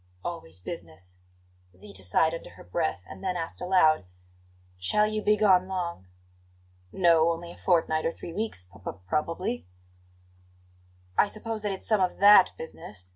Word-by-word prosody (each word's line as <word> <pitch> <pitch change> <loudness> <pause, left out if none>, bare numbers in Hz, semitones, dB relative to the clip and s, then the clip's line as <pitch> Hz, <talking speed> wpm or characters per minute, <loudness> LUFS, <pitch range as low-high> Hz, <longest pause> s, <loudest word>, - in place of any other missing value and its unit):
"Always 95 - -5
business!" 90 0 -9 0.6
Zita 100 0 -9
sighed 160 - +2
under 165 - -7
her - - -13
breath; 90 0 -2
and - - -11
then 185 -2 -1
asked 165 -1 -4
aloud: 180 - +4 0.7
"Shall 210 - +2
you 215 0 -1
be 210 0 +3
gone 190 -3 +4
long?" 175 - -4 0.8
"No; 170 -3 +4
only 170 +1 -5
a - - -12
fortnight 160 -3 +2
or - - 0
three 165 - -9
weeks, 210 - -2
p 90 +2 -18
p - - -3
probably." 150 - -2 1.5
"I - - +6
suppose 215 +1 -5
it's 195 -2 -3
some 215 -3 +3
of 180 -1 0
THAT 200 -1 +8
business?" 95 - -9
165 Hz, 150 wpm, -27 LUFS, -, 1.5 s, THAT